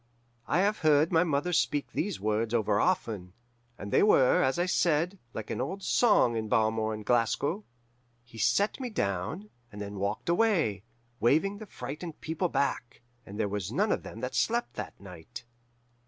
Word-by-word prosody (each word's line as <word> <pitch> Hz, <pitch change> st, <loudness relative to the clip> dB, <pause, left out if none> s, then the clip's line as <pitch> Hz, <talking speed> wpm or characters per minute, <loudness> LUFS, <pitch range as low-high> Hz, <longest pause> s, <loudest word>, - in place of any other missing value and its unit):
"I 170 Hz, -, +2 dB
have 205 Hz, +2 st, +1 dB
heard 155 Hz, 0 st, +4 dB
my 165 Hz, -1 st, +4 dB
mother 160 Hz, +1 st, 0 dB
speak 145 Hz, -3 st, 0 dB
these 195 Hz, -2 st, -2 dB
words 110 Hz, +3 st, 0 dB
over 105 Hz, -2 st, +2 dB
often, 110 Hz, -, -1 dB, 0.4 s
and 100 Hz, 0 st, -7 dB
they -, -, +5 dB
were, 135 Hz, -11 st, +5 dB
as 130 Hz, +3 st, +1 dB
I 175 Hz, -, +1 dB
said, 175 Hz, +1 st, +1 dB
like 110 Hz, -2 st, -6 dB
an -, -, -2 dB
old 190 Hz, +9 st, -4 dB
song 205 Hz, -, +3 dB
in 110 Hz, -1 st, -3 dB
Balmore 110 Hz, -1 st, +1 dB
and 105 Hz, -1 st, -9 dB
Glasgow. 135 Hz, -, +1 dB, 0.6 s
He 115 Hz, -1 st, -13 dB
set 200 Hz, -, +2 dB
me 255 Hz, -2 st, -3 dB
down, 120 Hz, -, -3 dB, 0.2 s
and 105 Hz, -, -10 dB
then 100 Hz, -1 st, -6 dB
walked 100 Hz, +2 st, -2 dB
away, 170 Hz, -, +2 dB, 0.4 s
waving 160 Hz, -, +2 dB
the 215 Hz, -, -9 dB
frightened 155 Hz, +1 st, -7 dB
people 165 Hz, +3 st, -2 dB
back; 130 Hz, -4 st, -2 dB, 0.3 s
and 100 Hz, +2 st, -8 dB
there 105 Hz, -, +1 dB
was 100 Hz, -1 st, -4 dB
none 200 Hz, -, +1 dB
of -, -, 0 dB
them -, -, -9 dB
that -, -, -3 dB
slept 235 Hz, +1 st, 0 dB
that -, -, -7 dB
night. 100 Hz, +6 st, -11 dB
135 Hz, 175 wpm, -29 LUFS, 110-180 Hz, 0.6 s, they